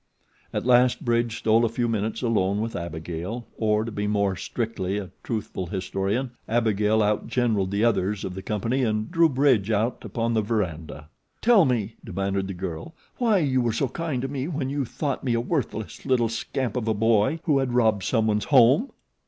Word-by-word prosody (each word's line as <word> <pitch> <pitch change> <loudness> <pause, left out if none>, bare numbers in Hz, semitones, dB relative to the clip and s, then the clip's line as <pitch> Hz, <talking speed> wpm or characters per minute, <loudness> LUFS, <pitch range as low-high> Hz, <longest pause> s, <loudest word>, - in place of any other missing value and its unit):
At - - -3
last 125 0 +4
Bridge 120 -1 +1
stole 115 +1 +3
a 115 - +2
few 120 +1 -1
minutes 110 +1 -2
alone 100 -4 +1
with 115 +1 -3
Abigail, 85 +7 -5
or, 110 0 +1
to 115 - -5
be 105 -1 -2
more 100 -2 +1
strictly 100 -1 -3
a 95 -4 -5
truthful 105 -5 -4
historian, 100 +6 -2 0.2
Abigail 110 -1 +2
outgeneraled 105 -1 0
the 100 +2 0
others 105 -3 +1
of 90 - -4
the 95 - -6
company 115 +6 -1
and 110 -1 -1
drew 165 -2 +4
Bridge 130 -7 +2
out 110 +3 0
upon 115 -1 -2
the 110 - +2
veranda. 85 -9 -3 0.3
"Tell 220 -6 +5
me," 110 -4 -1
demanded 95 +1 -2
the 95 - -5
girl, 95 - -6 0.2
"why 230 -4 +3
you 135 -7 +2
were 120 -1 +1
so 130 +3 0
kind 145 -3 -3
to - - -1
me 135 0 -3
when 145 -5 -3
you 140 -1 -1
thought 140 +4 -3
me 125 -3 +1
a - - +1
worthless 120 -5 -3
little 125 -4 +2
scamp 115 +1 -3
of 120 -3 -2
a 110 - +1
boy 110 +7 +2
who 145 -5 +2
had 130 -2 -1
robbed 110 -4 +3
some 110 +1 +1
one's 105 -1 +1
home." 135 - +5
115 Hz, 190 wpm, -25 LUFS, 100-125 Hz, 0.3 s, Tell